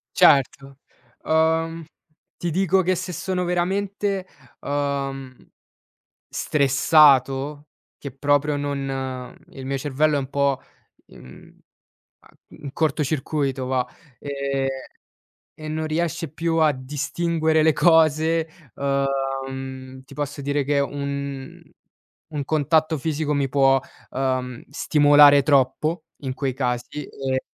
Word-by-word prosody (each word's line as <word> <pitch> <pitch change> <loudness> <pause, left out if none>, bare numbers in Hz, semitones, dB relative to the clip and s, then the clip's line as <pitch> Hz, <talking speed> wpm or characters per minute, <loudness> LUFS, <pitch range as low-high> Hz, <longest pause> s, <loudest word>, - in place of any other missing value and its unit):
Certo, 135 0 +3 0.5
uhm, 160 +1 +1 0.5
ti 175 - -3
dico 190 +2 +2
che 185 0 +1
se 180 +1 -5
sono 180 +2 -2
veramente, 195 +2 -1 0.3
uhm, 140 -2 -3 1.0
stressato 140 0 +3 0.3
che 140 - -7
proprio 145 +1 +1
non 135 -3 -4
il 135 -1 -9
mio 135 +1 -1
cervello 145 +2 +1
è - - +1
un 135 -1 -5
po 140 -1 +1 0.5
mhmm, - - -16
uhm, 65 - -15 1.0
in 140 -1 -7
corto 155 -1 0
circuito 135 -2 -2
va, 125 -1 0 0.3
ehm, 140 -1 -2 0.9
e 155 0 -9
non 155 +1 -2
riesce 165 +1 -2
più 165 0 -1
a 155 -2 +4
distinguere 155 +4 0
le 160 0 +4
cose 160 -1 +3 0.3
uhm, 135 -1 -3
ti - - -14
posso 145 0 -4
dire 145 0 0
che 145 +1 +1
un 140 -1 -4 0.7
un 145 -3 -3
contatto 155 +1 +1
fisico 150 0 -2
mi 140 -1 0
può, 135 0 +4 0.3
uhm, 130 -2 -2
stimolare 145 -1 +6
troppo 150 +4 +1 0.2
in 130 -1 -3
quei 135 -1 -2
casi 125 +3 -3
e 130 -1 -3
145 Hz, 115 wpm, -23 LUFS, 135-160 Hz, 1.0 s, stimolare